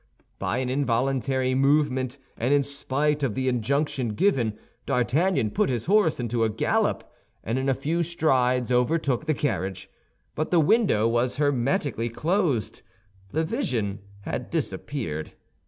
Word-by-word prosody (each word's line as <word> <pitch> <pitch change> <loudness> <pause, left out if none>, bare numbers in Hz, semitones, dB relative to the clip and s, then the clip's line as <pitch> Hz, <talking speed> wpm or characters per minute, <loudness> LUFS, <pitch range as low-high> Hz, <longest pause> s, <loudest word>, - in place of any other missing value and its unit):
By - - -1
an 130 -1 -1
involuntary 130 0 0
movement 135 -1 +2 0.2
and 125 +4 -1
in 140 - +3
spite 145 +1 -1
of 130 -7 -1
the 130 0 -1
injunction 130 -1 0
given, 120 - +1 0.3
D'Artagnan 130 - +1
put - - +1
his 120 -4 -2
horse 195 -6 +3
into 120 -1 0
a 110 - +2
gallop, 105 - 0 0.4
and 115 +5 -1
in 135 +1 0
a 135 - +2
few 160 +6 -1
strides 130 -7 +1
overtook 135 +2 +1
the 155 - +2
carriage; 95 -10 -3 0.4
but 155 - -2
the 175 - +4
window 155 - +3
was 120 +2 +1
hermetically 135 -4 0
closed, 150 - -1 0.5
the 160 +11 0
vision 120 - -2 0.2
had - - -4
disappeared. 80 - -4
130 Hz, 140 wpm, -25 LUFS, 120-150 Hz, 0.5 s, the